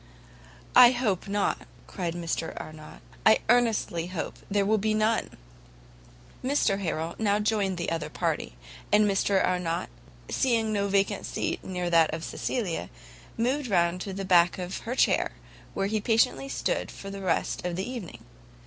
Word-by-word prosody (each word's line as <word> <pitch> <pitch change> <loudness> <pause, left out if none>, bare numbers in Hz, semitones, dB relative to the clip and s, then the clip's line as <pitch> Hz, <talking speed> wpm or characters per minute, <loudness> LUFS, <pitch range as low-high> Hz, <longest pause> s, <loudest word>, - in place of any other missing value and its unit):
"I 250 0 +9
hope 220 -8 -1
not," 200 0 -1 0.2
cried 175 -3 -4
Mr 165 -1 -3
Arnott, 155 0 -10 0.2
"I 220 - +7
earnestly 220 -8 +2
hope 180 -2 -5
there 200 0 +2
will 215 +1 +2
be 215 +1 +1
none!" 215 +1 +1 1.1
Mr 255 -7 +2
Harrel 165 -3 -2
now 205 -2 +2
joined 210 -3 0
another 165 -3 -2
party; - - -2 0.4
and 210 +1 +5
Mr 195 -1 +2
Arnott 180 - -1 0.4
seeing 225 -4 +1
no 200 -1 +1
seat - - -4
vacant 200 +1 -1
near 180 -2 -3
that 165 -2 +5
of 160 - -7
Cecilia, 175 - -3 0.5
moved 255 +4 0
round 175 -3 +1
to 195 - -4
the 195 +1 -4
back 175 -2 +4
of 180 0 -4
her 250 - -1
chair, - - +2 0.4
where - - 0
he 215 +1 -1
patiently 225 +5 +2
stood - - -1
for 195 - -8
the 200 0 -7
rest 190 - -1
of 175 -1 -2
the 190 +4 -3
evening. 180 - -7
195 Hz, 155 wpm, -27 LUFS, 175-220 Hz, 1.1 s, I